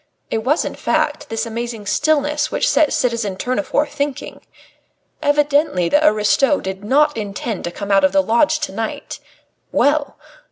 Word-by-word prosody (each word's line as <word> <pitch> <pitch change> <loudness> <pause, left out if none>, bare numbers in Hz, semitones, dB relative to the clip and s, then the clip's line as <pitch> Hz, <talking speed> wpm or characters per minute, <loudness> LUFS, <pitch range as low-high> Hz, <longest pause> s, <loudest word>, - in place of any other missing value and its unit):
It 225 - 0
was, 275 +8 +1
in - - -4
fact, 295 +1 -1
this 225 +1 -2
amazing 230 -1 -5
stillness 295 +4 +1
which - - 0
set 310 - +3
citizen 230 -6 -1
Tournefort 255 +6 -1
thinking. 285 -2 -4 0.8
Evidently 290 - +2
the 295 +1 +3
aristo 270 +4 +3
did 190 +1 -6
not 295 +7 +3
intend 215 +1 -4
to 175 - -3
come 200 +2 -5
out 195 - +4
of 285 - +4
the 290 0 +3
lodge 290 +7 +2
to 300 - -3
night. 225 -1 -5 0.5
Well! 290 0 +1
270 Hz, 155 wpm, -19 LUFS, 215-295 Hz, 0.8 s, out